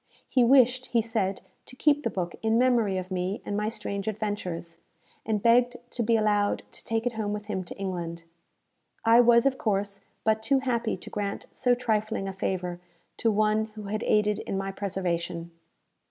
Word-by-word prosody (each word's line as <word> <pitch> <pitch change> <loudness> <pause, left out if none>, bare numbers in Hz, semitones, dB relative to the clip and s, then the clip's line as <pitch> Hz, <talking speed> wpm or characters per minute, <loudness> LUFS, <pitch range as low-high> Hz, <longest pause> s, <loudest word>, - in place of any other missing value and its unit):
He 255 - +3
wished, 255 0 +5
he 235 - +2
said, 210 -4 -1 0.3
to 255 - -9
keep 295 +2 +3
the - - -1
book 175 -2 -3
in 225 0 +2
memory 235 -6 +3
of 185 0 -5
me 185 +2 -1
and 205 - -3
my 210 +1 0
strange 210 -2 -4
adventures, 190 -6 -4 0.5
and 215 -2 0
begged 245 +1 +4
to 240 - -3
be 230 0 +3
allowed 205 -1 +1
to - - -12
take 225 +1 -1
it 245 - 0
home 215 -2 -2
with 210 0 -5
him 195 -3 -3
to - - -9
England. 170 -4 -4 0.8
I 230 +1 +7
was, 235 0 +6
of 270 -1 +2
course, 200 -2 -1 0.2
but 220 0 +2
too 265 +4 +2
happy 235 -4 -1
to - - -10
grant 200 -1 -3
so 245 -1 +2
trifling 220 -4 -1
a 195 - -4
favour 180 -2 -3 0.4
to 230 - +2
one 215 0 +2
who 215 - -7
had 210 +2 -3
aided 210 -1 +2
in 195 - -3
my 195 0 -2
preservation. 175 -3 -3
210 Hz, 185 wpm, -27 LUFS, 195-230 Hz, 0.8 s, I